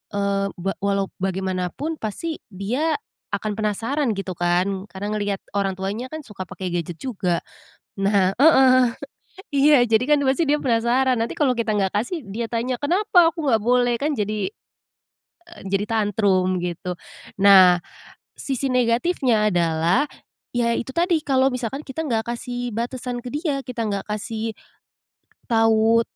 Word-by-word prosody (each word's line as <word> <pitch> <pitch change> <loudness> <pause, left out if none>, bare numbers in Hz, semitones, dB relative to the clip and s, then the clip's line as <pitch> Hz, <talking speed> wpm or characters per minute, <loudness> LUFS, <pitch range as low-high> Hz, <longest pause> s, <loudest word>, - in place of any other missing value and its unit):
eee, 200 0 0
be 195 +2 -2
walau 200 -1 0
bagaimanapun, 190 - -2
pasti 305 +10 -4
dia 240 - -1 0.4
akan 215 -1 -3
penasaran 225 +5 0
gitu, 195 -1 -4
kan. 185 +3 0
Karena 200 +1 -6
ngelihat 205 -2 -2 0.2
orang 195 -1 0
tuanya 200 +6 -4
kan 310 +3 -7
suka 195 -5 -8
pakai 185 0 -5
gadget 175 -1 -3
juga. 190 -9 -1 0.6
Nah 195 -1 +3
heeh. 260 -4 +6 0.7
Iya, 280 -2 +5
jadi 225 +1 +3
kan - - +1
pasti 270 +6 +2
dia 295 - +4
penasaran. 250 +1 +2
Nanti 230 - -2
kalau 275 -4 +3
kita 230 -2 -1
nggak 195 -2 0
kasih, 245 - -2
dia 225 +4 -4
tanya, 240 +2 -1
"Kenapa 355 +2 +4
aku 325 -1 -6
nggak 225 -5 +3
boleh?" 245 +1 +3
kan 295 +2 0
jadi, 210 - -1 0.8
eee, 345 0 -17
jadi 195 +2 0
tantrum, 200 -4 +1
gitu. 180 +1 -4 0.5
Nah, 185 -3 +8 0.6
sisi 270 -1 -1
negatifnya 240 -2 +2
adalah, 170 - +2 0.5
ya 235 -1 +2
itu 265 - -4
tadi, 345 0 +2
kalau 265 -1 +3
misalkan 250 +3 -3
kita 315 +4 -5
nggak 225 -4 0
kasih 245 +1 -4
batasan 245 +1 -3
ke - - -4
dia, 295 -3 -1
kita 240 -3 -3
nggak 200 -1 -3
kasih 220 +1 -3 1.0
tahu 225 0 +4
225 Hz, 145 wpm, -22 LUFS, 195-260 Hz, 1.0 s, Nah